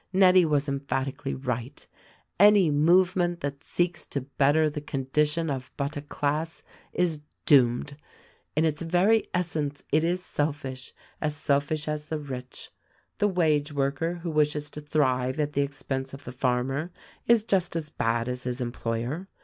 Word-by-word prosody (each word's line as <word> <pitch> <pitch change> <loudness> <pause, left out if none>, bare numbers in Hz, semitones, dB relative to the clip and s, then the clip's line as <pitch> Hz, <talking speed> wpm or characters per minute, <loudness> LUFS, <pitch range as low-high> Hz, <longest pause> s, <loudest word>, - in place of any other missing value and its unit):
Nettie 185 -1 +6
was 145 -2 +1
emphatically 135 0 -2
right: 125 0 -4 0.5
Any 200 -5 +6
movement 175 +3 +3
that 140 0 -4
seeks 175 -2 0
to 140 - -3
better 145 +3 +2
the 150 0 -4
condition 150 +3 0
of 130 -1 -5
but 140 +1 -2
a 145 - -4
class 150 +2 -2 0.3
is 170 -4 +1 0.3
doomed. 130 0 +4 0.6
In 155 +2 +3
its 155 0 0
very 180 +7 +2
essence 155 -5 -2
it 155 +2 +3
is 180 +2 0
selfish 140 -3 -3 0.2
— - - -32
as 150 -1 -1
selfish 145 +2 0
as 150 0 -3
the 160 - -1
rich. 130 -4 -7 0.5
The 205 - +4
wage 155 -6 +1
worker 145 +4 -1
who 170 -1 -5
wishes 150 -1 0
to 150 - -7
thrive 130 -2 0
at 150 -1 0
the 140 - +2
ex 140 0 -4
pense 135 0 -3
of 140 - -13
the 125 - -7
farmer 130 +5 -1 0.4
is 235 -2 +5
just 190 -6 0
as 155 -2 -3
bad 115 +1 0
as 125 0 -4
his 125 0 -2
employer. 120 +7 -3
150 Hz, 160 wpm, -27 LUFS, 135-165 Hz, 0.6 s, Nettie